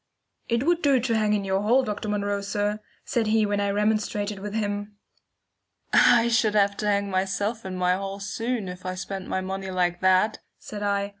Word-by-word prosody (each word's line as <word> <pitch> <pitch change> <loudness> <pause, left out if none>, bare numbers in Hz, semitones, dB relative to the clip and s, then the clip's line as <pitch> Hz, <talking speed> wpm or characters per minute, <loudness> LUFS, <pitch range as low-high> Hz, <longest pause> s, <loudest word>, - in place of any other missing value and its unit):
"It 235 +1 +1
would 345 +2 +2
do 275 -3 +4
to 235 -1 0
hang 215 -1 +2
in 205 -2 0
your 190 0 0
hall, 240 +6 +3
Dr. 210 -2 -4
Munro, 205 -1 -1
sir," 205 +1 -1 0.3
said 230 -2 0
he 220 0 +3
when 205 0 0
I 200 0 0
remonstrated 210 0 0
with 205 +2 -6
him. 205 -1 -3 1.0
"I 235 -1 +6
should 225 -2 +2
have 200 -1 +3
to 210 - -2
hang 200 -1 +1
myself 195 +4 -1
in 185 -1 -4
my 180 0 +2
hall 195 +1 -4
soon 225 +1 -3
if 180 0 -8
I 185 0 -3
spent 190 +1 -6
my 190 - -1
money 190 +1 -4
like 180 -1 0
that," 185 +3 +3 0.2
said 210 -1 -8
I. 200 -1 0
205 Hz, 200 wpm, -25 LUFS, 195-215 Hz, 1.0 s, I